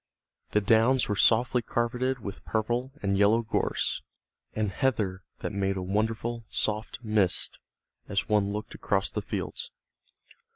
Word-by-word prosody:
The 105 - +4
downs 115 +5 +4
were 105 - 0
softly 120 +5 +4
carpeted 125 +3 0
with 100 -4 -7
purple 120 +4 -1
and 100 0 +1
yellow 110 +3 +5
gorse 115 - 0 0.5
and 105 -2 0
heather 100 -5 0 0.2
that - - -2
made 95 -1 0
a 95 - -2
wonderful 110 +4 -1
soft 110 0 -1
mist 105 -5 +1 0.5
as 100 +1 0
one 105 -2 +2
looked 105 +1 -5
across 95 -1 0
the - - -2
fields. - - -4
110 Hz, 135 wpm, -28 LUFS, 100-120 Hz, 0.5 s, yellow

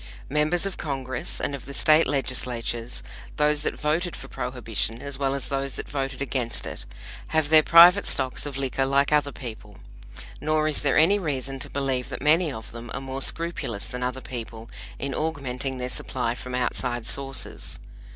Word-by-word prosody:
Members 155 +5 +3
of 195 - -3
Congress 130 -4 -3
and - - -1
of 140 - -6
the 140 +1 -6
State 155 0 +5
Legislatures 120 -3 -1 0.3
those 150 0 +3
that - - -1
voted 165 +4 0
for 135 - -9
Prohibition, 115 -4 -2
as 140 0 -4
well 135 -1 +1
as 140 - -3
those 135 -1 -1
that - - -4
voted 135 -1 -3
against 125 -3 -2
it - - -6 0.4
have 160 -2 +1
their 155 0 +8
private 175 +5 +8
stocks 130 +2 0
of 140 -2 -5
liquor 135 0 0
like 140 +1 +3
other 145 -1 +3
people; 110 -6 -9 0.6
nor 155 0 +2
is 155 - 0
there 140 -2 +3
any 195 +6 +5
reason 135 -5 -3
to - - -6
believe 135 -2 -1
that - - -5
many 155 +3 +4
of 110 -3 -8
them 115 0 -8
are - - -2
more 135 0 -5
scrupulous 165 -11 -1
than 125 - -5
other 125 +1 -2
people 115 -2 -7 0.3
in 140 0 -3
augmenting 135 -4 -2
their 125 0 -3
supply 125 -1 -2
from 125 +1 -6
outside 125 -1 -1
sources. 135 -1 -4
135 Hz, 180 wpm, -25 LUFS, 125-150 Hz, 0.6 s, their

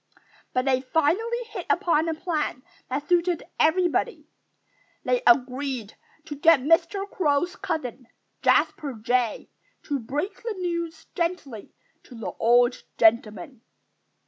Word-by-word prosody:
But 255 0 0
they 260 -1 +2
finally 335 - 0
hit 420 -6 -7
upon 335 -3 +2
a 320 - -1
plan 310 -6 -3 0.3
that 275 +3 -3
suited 350 -1 +1 0.2
everybody. 360 +8 +1 0.8
They 250 -1 +1
agreed 255 -2 +1 0.3
to 295 - -6
get 305 -1 +5
Mr. 335 +7 +2
Crow's 350 -1 0
cousin, 250 -5 -4 0.3
Jasper 290 -4 +2
Jay, 240 0 -1 0.3
to 285 -2 -2
break 295 - -4
the 455 -2 -4
news 340 -2 -3
gently 335 - -4 0.3
to 250 - -14
the 225 - -5
old 240 +2 +4 0.2
gentleman. 220 +1 +2
290 Hz, 120 wpm, -25 LUFS, 250-345 Hz, 0.8 s, get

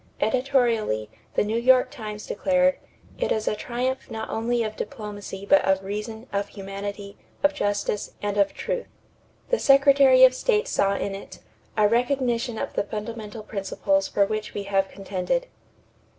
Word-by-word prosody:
Editorially, 230 - +1 0.2
the - - +3
New 220 +2 0
York 255 +1 +4
Times 215 -6 -7
declared: 275 0 +2 0.4
"It - - 0
is 215 -1 0
a - - +1
triumph 250 +4 -3
not 220 0 -5
only 235 +1 0
of 215 -1 -4
diplomacy 205 -5 -6
but 290 - +5
of 190 0 +2
reason, 210 +3 -5
of 200 0 0
humanity, 200 0 -7 0.2
of 290 0 +4
justice, 205 -5 -1
and 205 -1 -2
of 200 -1 +3
truth." 485 +1 -3 0.6
The - - +3
Secretary 275 -2 +6
of 255 0 +8
State 425 - +1
saw 200 0 +1
in 200 - -2
it 195 - -9 0.4
"a 210 -1 +5
recognition 240 0 0
of - - -4
the - - +1
fundamental 215 +1 -6
principles 195 -1 -1
for 200 - +2
which 215 +1 -4
we 205 - -2
have 195 -1 +1
contended." 195 - -2
220 Hz, 155 wpm, -25 LUFS, 200-260 Hz, 0.6 s, of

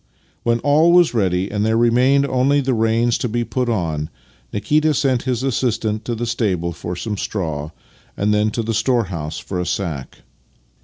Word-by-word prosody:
When 120 0 +1
all 155 +4 +4
was 175 -5 +5
ready 95 -4 0
and 105 0 -1
there 110 +1 +2
remained 125 +4 +3
only 135 +2 +2
the 135 -1 0
reins 115 +1 +1
to 125 - -2
be 120 +2 -1
put 125 +1 -2
on, 80 -8 -1 0.4
Nikita 150 +8 +1
sent 130 -3 +1
his 125 0 -1
assistant 115 -4 -1
to 120 - -2
the 120 +2 -3
stable 95 -8 -1
for 90 +2 -5
some 105 +3 -4
straw, 80 -8 -3 0.5
and 105 +1 +1
then 105 +1 +2
to 115 +2 -3
the 115 +1 -2
store 120 +2 +2
house 75 -1 -4
for 90 - -5
a 90 - -1
sack. 75 -9 -4
115 Hz, 185 wpm, -20 LUFS, 95-125 Hz, 0.5 s, was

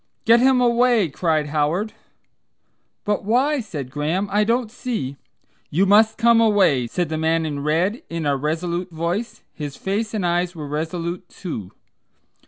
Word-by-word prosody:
"Get 230 +1 +6
him 260 +1 +4
away," 240 -5 +3
cried 155 0 0
Howard. 160 +8 0 1.1
"But 205 -1 0
why?" 260 +8 +2
said 145 - -7
Graham. 160 +8 -1
"I 210 +1 +3
don't 230 +1 0
see 220 - -4 0.3
" - - -41
"You 180 +6 +2
must 220 +2 +4
come 235 0 +5
away!" 195 - +3
said 175 +6 -2
the 155 0 -2
man 160 0 +1
in 145 -2 -3
red 165 - 0
in 165 -2 -3
a 140 -1 +2
resolute 170 +5 -2
voice. 175 +8 -3
His 145 -3 -6
face 215 +3 -2
and 200 -4 -1
eyes 175 +1 0
were 150 -3 -6
resolute, 170 +4 -4
too. 110 - -7
180 Hz, 160 wpm, -22 LUFS, 155-220 Hz, 1.1 s, Get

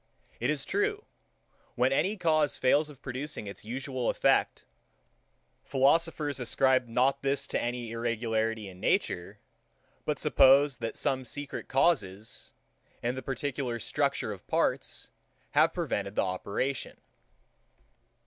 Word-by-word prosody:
It 120 - 0
is 150 -2 -1
true, 415 +1 0 0.7
when 125 +2 +3
any 200 +10 +1
cause 155 -5 +2
fails 145 +4 +3
of 145 -2 -14
producing 130 -1 -4
its 100 - -8
usual 130 +2 -3
effect, - - +2 1.0
philosophers 145 +1 +2
ascribe 130 +1 +2
not 130 +4 +2
this 140 0 0
to - - 0
any 120 -1 -3
irregularity 115 -2 -1
in 90 -1 -11
nature; 85 -1 0 0.7
but - - -1
suppose, 135 +1 +5
that 115 -1 -4
some 135 -2 0
secret 145 +3 -5
causes, 110 - 0 0.5
in 120 +1 0
the 130 - -5
particular 135 -2 -3
structure 115 - -1
of - - -9
parts, - - -1 0.4
have - - +4
prevented 100 +1 -2
the - - +2
operation. 100 +8 -2
130 Hz, 120 wpm, -29 LUFS, 115-145 Hz, 1.0 s, suppose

